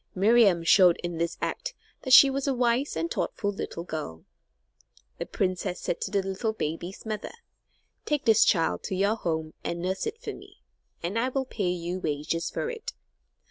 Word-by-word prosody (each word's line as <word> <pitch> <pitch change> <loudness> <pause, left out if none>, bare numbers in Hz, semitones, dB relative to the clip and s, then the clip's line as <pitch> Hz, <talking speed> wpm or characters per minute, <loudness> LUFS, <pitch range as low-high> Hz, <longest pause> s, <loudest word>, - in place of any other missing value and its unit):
Miriam 200 -3 +4
showed 180 0 +6
in 175 -1 -4
this 170 0 -1
act - - -3 0.3
that 260 - -4
she 275 +1 +9
was 275 +1 -2
a 270 - +1
wise 245 +3 +1
and 165 +1 -2
thoughtful 205 -1 -1
little 170 -3 -5
girl. 150 - -6 0.9
The - - -4
princess 185 -1 -2
said 170 - -3
to - - -2
the 200 -1 0
little 195 +4 -2
baby's 170 +1 -5
mother: 215 -1 -4 0.7
"Take 295 -3 -1
this 225 -2 +6
child 165 -5 +2
to 190 - -2
your 200 +3 +2
home 160 -6 -3
and 170 - -3
nurse 185 +2 -2
it 460 - -5
for 485 - -5
me, - - -15 0.4
and 190 +7 -1
I 250 +3 +1
will 265 0 -1
pay 200 -7 -2
you 175 +1 -3
wages 155 +1 -2
for - - -3
it." 465 -2 -7
190 Hz, 180 wpm, -27 LUFS, 170-235 Hz, 0.9 s, she